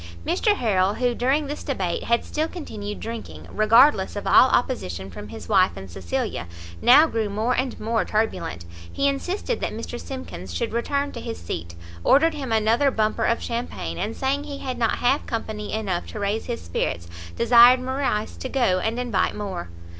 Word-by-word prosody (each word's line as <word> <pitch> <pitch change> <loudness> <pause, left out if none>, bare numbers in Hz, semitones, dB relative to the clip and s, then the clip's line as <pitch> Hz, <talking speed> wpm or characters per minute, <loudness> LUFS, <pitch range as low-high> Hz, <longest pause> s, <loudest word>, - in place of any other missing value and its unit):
Mr 420 - +2
Harrel, 200 - +1
who, 245 -1 +1
during 265 +5 +1
this 295 +2 -5
debate, 190 -11 -2
had 235 0 +1
still 310 +1 -1
continued 210 - -6
drinking, 230 0 -7
regardless 215 0 +4
of 205 - -5
all 260 - +6
opposition 95 - -1
from 105 +4 -8
his 110 +1 -9
wife 190 -3 +4
and 95 -2 -9
Cecilia, 85 -2 -3 0.3
now 280 +6 +8
grew 225 -8 -1
more 220 +5 0
and 255 0 -2
more 225 +1 0
turbulent; 210 - -2 0.3
he 280 - +1
insisted 365 - -2
that - - -2
Mr 230 +2 -6
Simkins 95 - -7
should 85 - -2
return 280 +4 -1
to - - -7
his 115 - -5
seat, 85 0 -6 0.3
ordered 320 +4 +5
him 275 -5 -5
another 225 +5 +3
bumper 220 -2 0
of 230 - +1
champagne, 230 - -4
and 225 - -2
saying 275 +2 -1
he 285 -2 -6
had 255 -3 -5
not 230 -2 +2
half 260 +4 +1
company 220 -2 -4
enough 195 -5 -2
to 215 - -7
raise 205 +2 -1
his 240 -2 -4
spirits, 85 0 -2 0.3
desired 240 +2 +7
Morrice 255 -4 -2
to 260 - -5
go 240 -10 +2
and 220 +5 -1
invite 235 -6 0
more. 190 - -5
230 Hz, 180 wpm, -24 LUFS, 200-260 Hz, 0.3 s, now